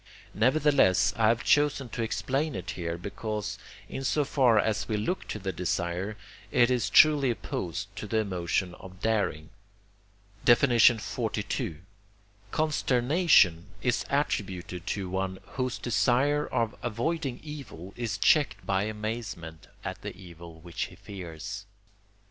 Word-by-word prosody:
Nevertheless, 115 -6 +4
I 110 -2 +3
have 115 +2 +2
chosen 145 -3 +3
to 115 - -4
explain 135 +6 -1
it 90 -1 -4
here, 85 -1 -4
because, 105 +3 -4 0.3
in 135 - -5
so 145 +2 +1
far 130 -5 +3
as 105 -1 +1
we 110 - 0
look 145 - -2
to - - -4
the 95 -2 -3
desire, 90 +3 -2 0.3
it 120 +1 +4
is 125 -2 +1
truly 150 -4 +6
opposed 90 -7 -4
to 105 - -5
the 110 - 0
emotion 90 -3 -1
of 95 0 -12
daring. 100 -8 -1 1.0
XLII. 115 - +3 0.7
Consternation 135 - +3 0.2
is 125 0 +1
attributed 95 - -2
to 100 -3 -2
one, 95 0 -2
whose 130 -1 -2
desire 125 +7 +2
of 115 0 0
avoiding 125 +4 -2
evil 135 - -8
is 115 -3 -3
checked 110 -7 +3
by 95 +1 +1
amazement 105 -7 -5 0.2
at - - -5
the - - -7
evil 85 -3 -12
which 85 0 -4
he - - -12
fears. 95 +1 -8
110 Hz, 130 wpm, -28 LUFS, 95-125 Hz, 1.0 s, truly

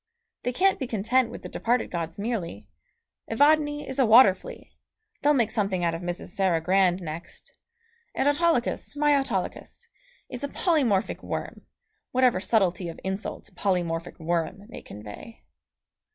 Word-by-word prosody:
They 245 - -1
can't 385 +9 +2
be 260 - -3
content 230 +3 +1
with - - -9
the - - -5
departed 240 +1 0
gods 165 -2 -4
merely. 195 - -4 0.6
Evadne 295 +4 +3
is 265 +1 -4
a 265 - +5
water 220 -3 +8
flea - - -12 0.5
they'll 295 +1 +4
make 230 -4 +2
something 195 -5 -1
out 170 -1 +1
of 165 - -5
Mrs. 175 0 -5
Sarah 185 -3 +1
Grand 185 +1 +2
next; 160 +1 -9 0.6
and 275 - +1
Autolycus, 290 -3 +1
my 295 0 +3
Autolycus! 275 -1 -3 0.4
is 250 +2 -7
a - - 0
polymorphic 275 - +1
worm, - - -6 0.5
whatever 250 -5 +3
subtlety 185 -3 +1
of 165 - -9
insult 190 +2 -5
"polymorphic 175 -3 -1
worm" 170 +3 -2
may - - -9
convey. 105 - -11
210 Hz, 145 wpm, -26 LUFS, 175-265 Hz, 0.6 s, water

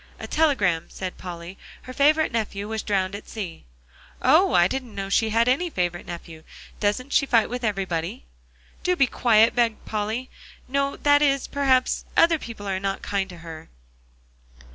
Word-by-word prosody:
"A - - -6
telegram," 210 - +1
said 185 -1 -6
Polly. 175 +1 -8 0.2
"Her 255 - -9
favorite 305 +4 +3
nephew 210 -3 -3
was 220 0 -3
drowned 195 -2 -1
at 205 - -8
sea." 190 - -7 0.5
"Oh! - - +4
I 175 0 +6
didn't 255 0 -5
know 195 0 -4
she 220 +2 +2
had 230 +2 +2
any 285 +8 +2
favorite 175 - -2
nephew. 170 -2 -8 0.4
Doesn't 220 +7 -1
she 275 - +3
fight 230 -3 +3
with 250 0 -4
everybody?" 185 - -2 0.6
"Do 360 - +1
be 275 -6 +4
quiet," 230 -2 +4
begged 235 -3 0
Polly. 220 +4 -3 0.4
"No; 275 +1 0
that 290 0 +4
is, 275 -2 +2
perhaps, 265 -2 +1
other 330 -1 +5
people 220 -6 -8
are 190 -1 -1
not 195 0 -3
kind 195 -1 -1
to 175 - -10
her." 160 -1 -9
220 Hz, 165 wpm, -24 LUFS, 190-260 Hz, 0.6 s, I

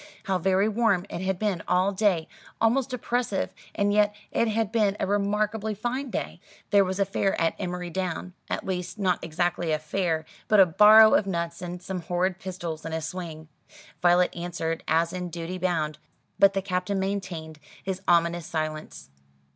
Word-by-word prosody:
How 190 -2 0
very 190 +3 +2
warm 215 -4 +2
it 170 - -4
had 190 0 -1
been 200 -4 -1
all 185 +2 +3
day, 190 -5 +1 0.3
almost 245 +3 +2
oppressive: 245 -4 -1 0.2
and 205 0 +1
yet 210 0 +3 0.2
it 230 - +1
had 220 -1 0
been 210 -3 +2
a - - +1
remarkably 210 +2 0
fine 250 +6 -3
day. - - -4 0.3
There 200 -1 +6
was 190 +1 -3
a 200 - +3
fair 195 0 0
at 165 0 +2
Emery 180 -1 -4
Down 185 0 -3 0.2
at - - -3
least 180 +1 -3
not 185 -3 0
exactly 170 0 -1
a 155 - +2
fair, 160 +1 -1 0.2
but 215 - +5
a 190 - +9
barrow 215 +5 +8
of 195 - +3
nuts 170 -2 -3
and 180 0 -6
some 185 -1 -4
horrid 180 +2 -1
pistols, 175 -4 -5
and 160 0 -4
a - - -1
swing. 160 -1 -6 0.5
Violet 175 0 +4
answered, 170 -1 -3
as 165 +2 +2
in 180 -1 -4
duty 170 +2 -5
bound; 160 -4 -1 0.4
but 200 0 +6
the 195 -1 -1
Captain 185 +1 -1
maintained 185 -5 -4 0.2
his 190 -1 -3
ominous 170 -1 +2
silence. 155 - -4
185 Hz, 175 wpm, -26 LUFS, 170-200 Hz, 0.5 s, a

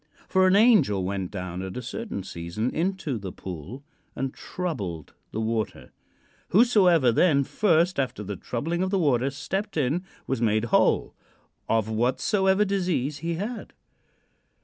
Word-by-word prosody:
"For 190 0 +4
an 185 - +4
angel 200 - +5
went 95 -1 -2
down 90 -2 -5
at 95 +4 -6
a - - -3
certain 210 - -5
season 90 +7 -4
into 165 - -2
the 95 -2 -6
pool 95 - -8 0.3
and 135 -1 -3
troubled 100 - -5 0.2
the 110 - -3
water: 110 -1 -2 0.6
whosoever 185 - +5
then 140 +2 +4
first 170 0 +2
after 125 -6 -2
the 100 0 -5
troubling 160 - -3
of 185 - 0
the 195 - +1
water 135 -6 +2
stepped 195 +8 -4
in 150 +5 +1 0.2
was 135 -3 -2
made 110 0 +2
whole - - +3 0.6
of 110 -2 +2
whatsoever 145 - +2
disease 175 -8 -1
he 165 +2 -2
had. 215 +8 -5
135 Hz, 145 wpm, -26 LUFS, -, 0.6 s, angel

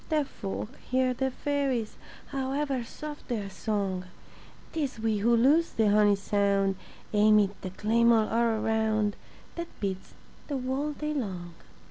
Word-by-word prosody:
Deaf 305 -3 +1
folk 200 -2 -5 0.2
hear 255 0 +2
the 265 +2 0
fairies, 270 -5 -1 0.3
However 270 -1 -1
soft 295 +5 -8
their 210 -5 -3
song; 195 -3 -2 0.7
Tis 285 -7 -2
we 220 -2 +1
who 235 +3 +4
lose 295 +8 +4
the 215 -2 +3
honey 205 -1 +5
sound 200 -1 +1 0.4
Amid 210 -1 +5
the 185 - -4
clamor 225 +3 +3
all 230 -1 +2
around 220 -2 +1 0.4
That 340 0 -3
beats 190 -2 -4 0.3
the 285 - -2
whole 265 +4 -2
day 300 +1 -3
long. 185 - -4
225 Hz, 135 wpm, -28 LUFS, 205-270 Hz, 0.7 s, honey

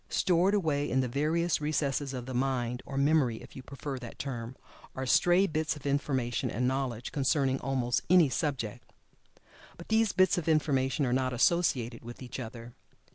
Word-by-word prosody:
Stored 185 +2 +2
away 150 -7 0
in 130 +1 +2
the 130 - -1
various 155 +5 0
recesses 145 -2 -1
of 125 -2 -5
the 130 - -6
mind, 125 -1 -1
or 135 - -5
memory 140 -5 +2
if - - -14
you 130 - -7
prefer 140 +1 -6
that 120 -2 -9
term, 120 -2 -5 0.4
are 130 - -3
stray 175 +9 +4
bits 155 -3 -1
of 145 - -12
information 135 -4 -1
and 125 +4 -1
knowledge 130 -3 -2
concerning 135 -1 +1
almost 125 -2 0
any 180 -3 +6
subject. 130 -6 -3 0.9
But 170 - -12
these 220 -1 +3
bits 185 0 +3
of 170 - -7
information 140 -2 +1
are 125 - 0
not 130 0 0
associated 125 -5 +1
with 120 +2 -9
each 125 - -7
other. 115 0 -8
135 Hz, 175 wpm, -30 LUFS, 125-155 Hz, 0.9 s, any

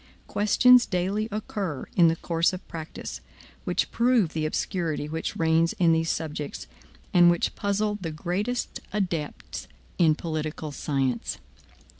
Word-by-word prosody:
Questions 245 +4 +5
daily 200 +4 -1
occur 200 - -3
in 170 -2 +6
the 165 - +3
course 165 +1 +1
of 185 - -7
practice, 160 -1 -7 0.4
which - - 0
prove 235 -8 +3
the 155 -1 0
obscurity 160 -2 -2
which 160 +2 -4
reins 165 +1 +3
in 170 -2 +3
these 165 0 +2
subjects, 150 -2 -3 0.5
and 175 -1 +7
which 175 0 +1
puzzle 205 +1 0
the 165 - -3
greatest 185 +10 -2
adepts 175 -7 -3 0.3
in 160 -3 +5
political 155 -1 -4
science. 135 -4 -1
170 Hz, 130 wpm, -26 LUFS, 155-200 Hz, 0.5 s, and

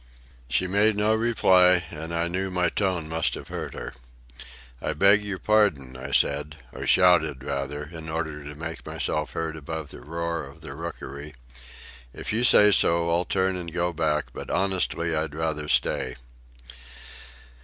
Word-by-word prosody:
She 85 +8 +1
made 100 +3 +2
no 105 +1 +3
reply, 95 -6 +4
and 80 +1 -7
I 85 0 0
knew 95 +2 -2
my 90 -1 +1
tone 90 -6 -1
must 80 0 0
have - - -9
hurt - - -5
her. - - -6 0.9
"I - - -1
beg 100 +2 +5
your 100 -2 -3
pardon," 95 -13 +2
I 65 +2 -7
said, 75 +2 +1 0.2
or - - -6
shouted, 80 -7 +4
rather, 70 +2 -3
in 80 +1 -9
order 80 -2 -3
to 75 +1 -8
make 80 +2 -6
myself 75 -1 -2
heard 80 -1 -3
above 80 0 -6
the - - -10
roar 85 +3 -3
of 70 0 -12
the - - -7
rookery. 75 -2 -7 0.8
"If - - -4
you 115 +3 +1
say 105 -4 +7
so, 85 -3 +3
I'll 85 +2 +1
turn 95 +1 +1
and 85 -2 -5
go 85 +1 -1
back; 75 -2 -1
but - - -7
honestly, 90 -3 0
I'd 80 -1 -2
rather 80 -2 -2
stay." 65 - +1
85 Hz, 165 wpm, -25 LUFS, 75-95 Hz, 0.9 s, say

